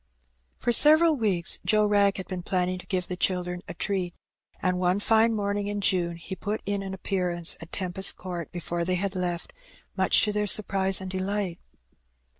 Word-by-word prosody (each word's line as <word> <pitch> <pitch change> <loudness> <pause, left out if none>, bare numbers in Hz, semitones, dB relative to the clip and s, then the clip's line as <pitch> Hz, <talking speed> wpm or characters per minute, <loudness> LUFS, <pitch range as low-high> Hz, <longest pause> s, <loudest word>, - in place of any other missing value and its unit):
For 240 - 0
several 310 +5 +6
weeks 195 -9 0
Joe 215 -1 +3
Wrag 200 -1 +3
had 190 - -6
been 185 -2 -5
planning 185 0 -1
to - - -11
give 185 -2 -1
the 180 - -4
children 180 -1 -1
a - - -7
treat; 185 -4 -2 0.4
and 180 -1 0
one 180 +2 +1
fine 225 +2 +3
morning 205 -1 -2
in 205 0 -2
June 180 -3 0
he 170 +3 -7
put 205 +4 -4
in 200 0 -1
an 190 -1 -5
appearance 180 -3 -1
at 165 - -10
Tempest 190 0 +1
Court 175 -3 -6
before 175 0 -3
they 180 +1 0
had 195 +1 -2
left, 175 -2 -3 0.4
much - - +5
to 210 - +2
their 210 0 -1
surprise 195 -2 +3
and 190 -1 -6
delight. 190 -1 -2
190 Hz, 185 wpm, -26 LUFS, 180-205 Hz, 0.4 s, several